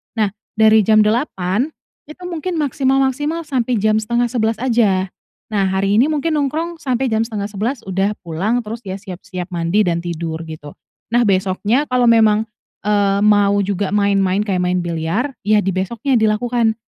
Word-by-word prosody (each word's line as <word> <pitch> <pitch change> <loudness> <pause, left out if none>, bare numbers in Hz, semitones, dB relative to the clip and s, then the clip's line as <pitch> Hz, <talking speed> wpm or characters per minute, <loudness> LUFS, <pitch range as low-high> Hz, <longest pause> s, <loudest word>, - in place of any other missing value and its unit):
Nah, 215 -3 +1 0.2
dari 220 -1 +5
jam 215 -1 +5
8.00, 215 0 0 0.4
itu 305 +4 -13
mungkin 345 +1 -4
maksimal-maksimal 270 +3 0
sampai 255 -4 -1
jam 215 0 +3
10.30 230 0 0
aja. 210 -7 +2 0.4
Nah, 200 -2 +1
hari 195 +1 0
ini 260 +7 +4
mungkin 315 +1 -1
nongkrong 315 +4 -2
sampai 265 -2 -1
jam 220 -1 +1
10.30 215 +3 -3
udah 195 +2 0
pulang, 195 +9 -1
terus, 225 +2 -6
ya, 190 0 -4
siap-siap 185 -2 -8
mandi, 170 +5 +1
dan 170 -1 0
tidur, 165 -1 -4
gitu. 155 -2 -9 0.4
Nah, 240 - +4
besoknya 200 +7 +1
kalau 250 -1 +2
memang, 220 -1 +4 0.4
eee, 200 -1 +2
mau 205 -1 +4
juga 200 0 -1
main-main, 200 -1 +2
kayak 185 -3 0
main 180 0 +1
biliar 170 - -2
ya, 210 0 +4
di 195 - -1
besoknya, 235 +7 0
dilakukan, 225 +1 +1
215 Hz, 155 wpm, -18 LUFS, 190-245 Hz, 0.4 s, dari